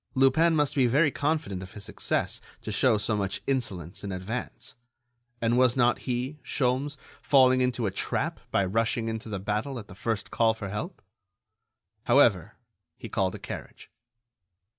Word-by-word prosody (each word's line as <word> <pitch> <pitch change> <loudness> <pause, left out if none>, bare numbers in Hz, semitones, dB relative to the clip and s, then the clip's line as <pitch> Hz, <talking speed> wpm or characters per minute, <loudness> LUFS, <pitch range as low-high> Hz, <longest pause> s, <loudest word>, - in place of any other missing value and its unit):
Lupin 145 +6 +4
must 145 -2 +2
be 130 -3 +3
very 140 +5 +3
confident 145 - -1
of 95 +1 -10
his 105 -2 -8
success - - -1 0.2
to 110 - -4
show 110 +2 +3
so 105 +1 0
much 100 -1 -2
insolence 100 - -2
in 100 - -4
advance; 95 +7 -5 0.7
and 115 +2 +2
was 130 0 +4
not 120 -1 +3
he, 125 +5 -2
Sholmes, 135 +2 0 0.2
falling 130 -3 +5
into 125 -2 0
a 100 - 0
trap 95 - -2
by 100 - +2
rushing 115 +3 0
into 110 0 -5
the 105 - -2
battle 105 +8 -2
at 105 -3 -8
the - - -11
first 110 +1 -3
call 115 -1 +3
for 105 -3 -6
help? 110 - -5 1.0
However, - - +4 0.4
he - - -8
called 95 -1 0
a - - -5
carriage. - - -9
115 Hz, 160 wpm, -27 LUFS, 105-130 Hz, 1.0 s, falling